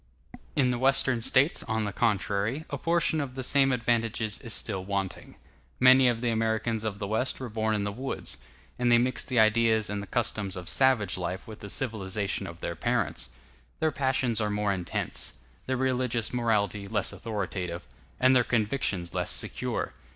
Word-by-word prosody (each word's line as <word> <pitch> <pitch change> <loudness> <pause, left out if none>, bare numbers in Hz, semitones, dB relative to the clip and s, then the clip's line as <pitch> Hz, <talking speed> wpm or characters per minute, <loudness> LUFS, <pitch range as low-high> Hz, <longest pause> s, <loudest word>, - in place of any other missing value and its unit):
In 125 - +3
the 120 - -2
Western 135 -2 +3
States, 130 +7 +3
on 110 -1 -1
the 105 -2 -3
contrary, 105 +7 0
a 140 - -2
portion 165 -1 +1
of 130 -3 -5
the 130 - -4
same 135 +1 +4
advantages 115 -3 0
is 115 - -6
still 100 -3 -1
wanting. 95 -1 -4 0.4
Many 130 0 +7
of 120 -2 +1
the 120 -1 +1
Americans 110 0 0
of 105 -2 -3
the 100 - -4
West 110 +6 -1
were 130 -2 -5
born 110 0 0
in 105 - -1
the 105 - -2
woods, 120 - -4 0.4
and 120 -1 +2
they 120 - +7
mix 125 +2 +1
the 130 - -2
ideas 110 -1 +3
and 105 0 -2
the 100 - -8
customs 105 -5 -1
of 90 -3 -6
savage 110 - +2
life 90 +1 -4
with 110 -1 -9
the 100 - -8
civilization 100 -4 -1
of 85 0 -10
their 85 - -3
parents. - - -1 0.5
Their 160 -1 +2
passions 130 -4 0
are 105 - 0
more 105 -1 0
intense; 90 -2 -2 0.3
their 130 0 0
religious 125 -3 0
morality 105 -4 0
less 105 0 0
authoritative; 95 -4 -4 0.3
and 130 +1 +5
their 125 - +5
convictions 105 -7 -1
less 90 -1 -1
secure. - - -1
110 Hz, 180 wpm, -28 LUFS, 100-125 Hz, 0.5 s, Many